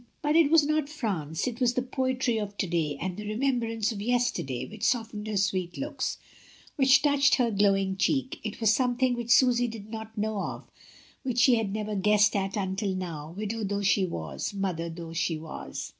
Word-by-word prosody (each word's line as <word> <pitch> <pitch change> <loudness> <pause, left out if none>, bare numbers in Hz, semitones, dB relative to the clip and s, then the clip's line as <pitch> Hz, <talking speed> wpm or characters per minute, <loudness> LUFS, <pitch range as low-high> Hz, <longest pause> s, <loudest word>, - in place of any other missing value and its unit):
But 295 +1 +2
it 325 -3 +5
was 315 -2 +5
not 305 -1 0
France, 190 - -3
it 240 -2 -4
was 245 -1 +3
the 255 - +1
poetry 255 -2 0
of 205 -1 -5
to - - 0
day 165 -5 -1
and 180 +1 -3
the 210 +1 -7
remembrance 230 -1 0
of 205 -3 -5
yesterday 235 - 0
which 215 -1 -11
soft 230 -3 +1
ened 210 +1 -5
her 215 -1 -1
sweet 185 -3 -1
looks, 285 +2 -3 0.6
which 265 -1 +5
touched 280 -2 +4
her 240 -3 +1
glowing 195 -2 +2
cheek. 260 +8 0
It 215 - -5
was 225 -2 +4
something 250 +1 +1
which 240 -1 -4
Susy 245 0 +5
did 220 -2 -8
not 220 0 -7
know 210 -1 -1
of, - - -6 0.5
which 255 -3 -3
she 250 +1 +6
had 225 -4 +1
never 215 0 -3
guessed 210 +2 +3
at 195 +1 -1
until 190 0 -1
now, 165 -3 -6
widow 215 +2 -3
though 200 0 -2
she 195 -1 +3
was, 80 - -5
mother 180 -4 -2
though 165 0 -8
she 165 -1 0
was. 155 0 -7
215 Hz, 200 wpm, -28 LUFS, 190-245 Hz, 0.6 s, she